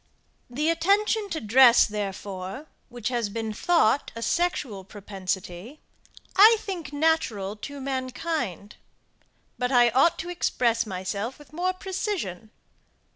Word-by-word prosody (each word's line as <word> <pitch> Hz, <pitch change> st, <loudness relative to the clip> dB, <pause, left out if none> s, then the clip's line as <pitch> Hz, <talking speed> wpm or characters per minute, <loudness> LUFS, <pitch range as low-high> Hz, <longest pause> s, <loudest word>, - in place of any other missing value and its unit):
The 300 Hz, +7 st, 0 dB
attention 405 Hz, +5 st, +1 dB
to 320 Hz, -, -3 dB
dress, 240 Hz, +1 st, +6 dB
therefore, 200 Hz, +2 st, -5 dB, 0.2 s
which 240 Hz, -2 st, -4 dB
has 240 Hz, -4 st, -1 dB
been 220 Hz, +1 st, -4 dB
thought 285 Hz, -1 st, +2 dB
a 230 Hz, -, -5 dB
sexual 285 Hz, -, -1 dB
propensity, 195 Hz, -, -6 dB, 0.6 s
I 435 Hz, +4 st, +8 dB
think 365 Hz, -9 st, -6 dB
natural 285 Hz, -10 st, 0 dB
to 285 Hz, +6 st, -8 dB
mankind. 260 Hz, -, -4 dB, 0.8 s
But 250 Hz, +1 st, 0 dB
I 240 Hz, -2 st, +5 dB
ought 275 Hz, +8 st, +3 dB
to 350 Hz, -, -6 dB
express 235 Hz, -10 st, 0 dB
myself 200 Hz, +5 st, -4 dB
with 295 Hz, -2 st, -17 dB
more 360 Hz, +3 st, 0 dB
precision. 370 Hz, -, -4 dB
250 Hz, 120 wpm, -26 LUFS, 210-325 Hz, 0.8 s, I